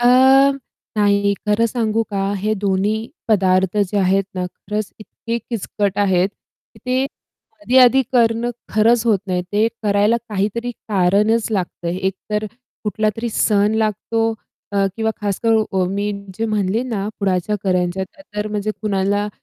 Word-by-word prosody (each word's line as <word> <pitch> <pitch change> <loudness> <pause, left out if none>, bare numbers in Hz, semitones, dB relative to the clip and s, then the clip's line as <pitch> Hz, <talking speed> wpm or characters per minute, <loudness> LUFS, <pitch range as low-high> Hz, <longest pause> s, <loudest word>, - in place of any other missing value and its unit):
अ, 240 - +3 0.9
नाही 200 -1 +3
खरं 210 +2 +3
सांगू 225 -1 0
का, 195 0 -1
हे 210 +3 -1
दोन्ही 205 +2 0 0.2
पदार्थ 190 -2 +2
जे 205 0 +1
आहेत 195 +1 +2
ना 180 -1 -2
खरंच 210 +3 -5
इतके 230 +2 -5
किचकट 205 -3 -3
आहेत 190 -2 +3
की - - -27
ते 255 +1 +1 0.6
आधी-आधी 260 0 +5
करणं 235 -1 +2 0.2
खरंच 225 +2 +3
होत 215 -4 +4
नाही. 180 -1 -1
ते 210 +2 +3 0.2
करायला 205 +2 +3
काहीतरी 215 +4 -1
कारणच 210 +2 +1
लागतं, 180 -4 -2
एकतर 190 +4 -2 0.4
कुठलातरी 215 +2 -1
सण 210 0 +2
लागतो 225 +1 0 0.4
अ, 200 -1 +2
किंवा 220 -1 0
खासकरून 215 +2 +1
अ, 190 -1 +2
मी 200 +2 -1 0.3
जे 225 - 0
म्हणले 215 +1 0
ना 215 -5 -3
पुढाच्या 190 +1 0
करंज्या, 180 0 0 0.3
तर 210 0 -1
म्हणजे 210 0 -2
कुणाला 205 0 0
210 Hz, 135 wpm, -19 LUFS, 195-225 Hz, 0.9 s, आधी-आधी